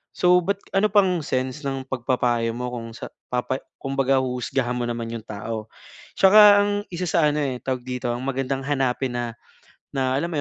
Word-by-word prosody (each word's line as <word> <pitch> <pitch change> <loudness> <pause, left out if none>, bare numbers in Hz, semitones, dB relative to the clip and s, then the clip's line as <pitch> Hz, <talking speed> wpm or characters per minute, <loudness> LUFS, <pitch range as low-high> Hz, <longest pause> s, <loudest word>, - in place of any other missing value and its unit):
So, 180 0 +4
ba't 200 0 -1 0.2
ano 210 +2 +3
pang 185 -4 +4
sense 130 +2 -2
ng 135 -1 -3
pagpapayo 120 -2 0
mo, 125 +1 -4
kung 115 -2 -6
sa - - -8 0.2
papa 125 +1 0 0.2
kumbaga 135 -1 +1
huhusgahan 125 0 -2
mo 120 - -1
naman 115 -1 -3
'yong 115 -1 -6
tao. 110 0 -5 0.5
Tsaka 205 +1 +8
ang 205 - +1 0.2
isa 175 +1 -2
sa 165 -2 +3
ano 150 +1 -1
eh, 135 -3 -1
tawag 130 -1 -2
dito, 125 -1 -3
ang 120 - -5
magandang 135 0 -2
hanapin 135 -2 0
na, 120 -1 -3 0.6
na 130 -1 0
alam 170 +5 -1
mo' - - -1
130 Hz, 185 wpm, -23 LUFS, 120-150 Hz, 0.6 s, Tsaka